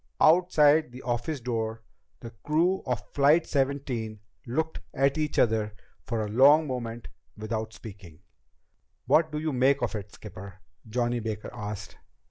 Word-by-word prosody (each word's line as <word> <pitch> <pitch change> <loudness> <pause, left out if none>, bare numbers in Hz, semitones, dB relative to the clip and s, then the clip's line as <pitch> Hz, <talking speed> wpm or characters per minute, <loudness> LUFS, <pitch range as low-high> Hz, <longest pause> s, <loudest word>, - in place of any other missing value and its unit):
Outside 155 -4 +5
the 125 +1 -10
office 125 +5 -2
door, 115 -2 -3 0.4
the 115 - -8
crew 170 +5 +1
of 115 -5 -2
Flight 145 +4 +4
Seventeen 135 -6 -2 0.3
looked 160 +6 -2 0.2
at 140 +1 +2
each 155 -1 -2
other 110 -2 +2 0.3
for 115 -4 -1
a 105 - -6
long 145 +7 +6
moment 120 -4 -5 0.3
without 110 +1 -4
speaking. 95 -7 -12 0.8
"What 160 -1 +3
do 150 - -3
you 155 -1 -2
make 135 +2 +3
of - - -1
it, 105 -1 -6
skipper?" 100 -2 -11 0.3
Johnny 120 +1 0
Baker 110 -1 -5
asked. 105 -1 -7
120 Hz, 140 wpm, -27 LUFS, 110-145 Hz, 0.8 s, long